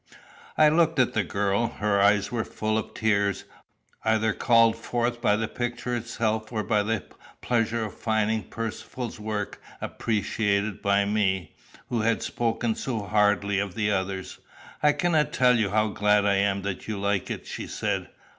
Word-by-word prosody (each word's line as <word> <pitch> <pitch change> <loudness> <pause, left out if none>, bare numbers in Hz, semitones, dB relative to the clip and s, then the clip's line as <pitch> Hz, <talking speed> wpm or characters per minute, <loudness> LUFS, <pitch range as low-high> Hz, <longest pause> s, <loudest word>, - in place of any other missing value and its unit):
] - - -21
I 155 - +7
looked 160 0 +3
at 130 -2 +3
the 110 - +1
girl. 100 +4 0
Her 105 -2 0
eyes 100 0 +3
were 115 -2 -1
full 110 0 -2
of 110 - -3
tears, 100 -3 +1 0.6
either 110 -1 +2
called 115 -1 +4
forth 120 +1 -2
by 105 -3 +3
the 110 +1 -1
picture 120 +1 -3
itself 110 -2 -2
or 110 -2 -1
by 105 -1 +2
the 110 0 -1 0.4
pleasure 115 -1 0
of 105 - -7
finding 110 -2 0
Percivale's 115 +2 -5
work 105 -1 -4 0.2
appreciated 105 -2 -1
by 100 0 +2
me, 95 -5 0 0.4
who 120 -2 0
had 115 +1 +1
spoken 115 -1 -1
so 115 -1 -3
hardly 100 -1 +2
of 100 -3 -3
the 105 -2 +1
others. 95 -1 -3 0.4
"I 150 0 +5
cannot 155 0 +1
tell 125 -1 +4
you 105 -3 +1
how 110 +1 +2
glad 105 0 +2
I 100 -1 +3
am 100 0 +1
that 100 -1 -4
you 105 -2 -3
like 100 -1 0
it," - - -5
she - - -6
said. - - -2
110 Hz, 170 wpm, -26 LUFS, 100-115 Hz, 0.6 s, I